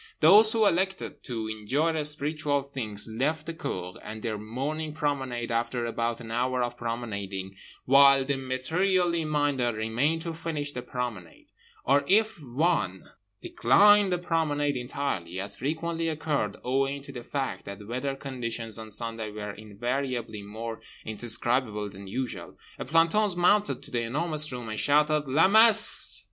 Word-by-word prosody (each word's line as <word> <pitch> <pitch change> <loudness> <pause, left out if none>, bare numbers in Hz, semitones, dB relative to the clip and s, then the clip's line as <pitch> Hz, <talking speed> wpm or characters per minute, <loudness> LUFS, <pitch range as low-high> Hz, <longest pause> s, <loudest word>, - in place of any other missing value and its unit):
Those 210 +7 +8
who 225 -1 +3
elected 190 0 0
to 115 -4 -4
enjoy 140 +10 0
spiritual 150 -1 -1
things 115 -7 -2
left 145 +8 -1
the 165 - -4
cour 90 - -5
and 110 0 -8
their 110 -3 -2
morning 145 +8 -4
promenade 135 -6 -2
after 120 +1 -1
about 115 0 -2
an 115 -2 -9
hour 125 +2 0
of 120 0 -3
promenading, 100 -5 -4 0.3
while 135 0 +6
the 140 +1 0
materially 170 +6 0
minded 145 -6 +1
remained 120 +9 0
to 165 -1 -4
finish 160 -3 -3
the 125 - -5
promenade; 120 -10 -6 0.4
or 140 +2 +4
if 215 -2 +3
one 125 - -1 0.3
declined 205 - +5
the 180 - +2
promenade 150 -4 0
entirely 120 -9 -3
(as 100 +1 -2
frequently 165 +4 -2
occurred 150 -9 -1
owing 135 +2 0
to 140 - -9
the 125 -3 -7
fact 135 +2 -4
that 100 +1 -8
weather 130 +4 -2
conditions 115 -5 -5
on 110 0 -8
Sunday 115 0 -4
were 105 -1 -6
invariably 120 +2 -3
more 110 +3 -7 0.2
indescribable 110 -1 0
than 100 0 -11
usual) 125 +5 -5 0.2
a - - -4
planton 165 +7 +3
mounted 205 +4 +3
to - - -13
The 120 - 0
Enormous 150 +5 0
Room 125 -2 -6
and 110 0 -3
shouted, 150 +1 +3
"_La 150 +6 +4
Messe! 220 +2 +4
130 Hz, 150 wpm, -27 LUFS, 115-155 Hz, 0.4 s, Those